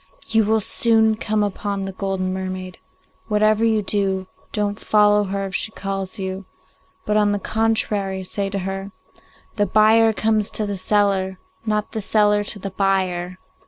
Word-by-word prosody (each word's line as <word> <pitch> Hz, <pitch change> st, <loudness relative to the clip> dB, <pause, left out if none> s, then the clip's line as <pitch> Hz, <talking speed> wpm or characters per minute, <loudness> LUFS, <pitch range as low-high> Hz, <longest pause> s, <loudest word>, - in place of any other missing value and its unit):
You 220 Hz, -1 st, +2 dB
will 220 Hz, +1 st, +2 dB
soon 220 Hz, +1 st, +3 dB
come 215 Hz, -1 st, -1 dB
upon 200 Hz, -1 st, -3 dB
the 195 Hz, -, -4 dB
golden 190 Hz, -1 st, -2 dB
mermaid. 185 Hz, -1 st, -5 dB, 0.5 s
Whatever 215 Hz, 0 st, +2 dB
you 220 Hz, -2 st, +2 dB
do, 195 Hz, -1 st, -1 dB, 0.3 s
don't 205 Hz, -1 st, -2 dB
follow 210 Hz, -1 st, +3 dB
her 195 Hz, 0 st, -3 dB
if 190 Hz, -, -7 dB
she 220 Hz, -, 0 dB
calls 195 Hz, +1 st, -4 dB
you, 190 Hz, 0 st, -5 dB, 0.6 s
but 210 Hz, -, +1 dB
on 205 Hz, -1 st, +3 dB
the -, -, 0 dB
contrary 205 Hz, -3 st, -1 dB
say 195 Hz, +2 st, -2 dB
to 200 Hz, -, -3 dB
her, 195 Hz, +1 st, -4 dB, 0.7 s
"The 205 Hz, -1 st, +2 dB
buyer 220 Hz, +3 st, +5 dB
comes 215 Hz, -1 st, 0 dB
to 215 Hz, -, -1 dB
the 205 Hz, -1 st, -3 dB
seller, 195 Hz, -1 st, +1 dB, 0.3 s
not 210 Hz, -1 st, -1 dB
the 220 Hz, -, -3 dB
seller 210 Hz, 0 st, +2 dB
to 210 Hz, -, +2 dB
the 195 Hz, 0 st, -6 dB
buyer." 185 Hz, -2 st, 0 dB
205 Hz, 160 wpm, -21 LUFS, 190-215 Hz, 0.7 s, buyer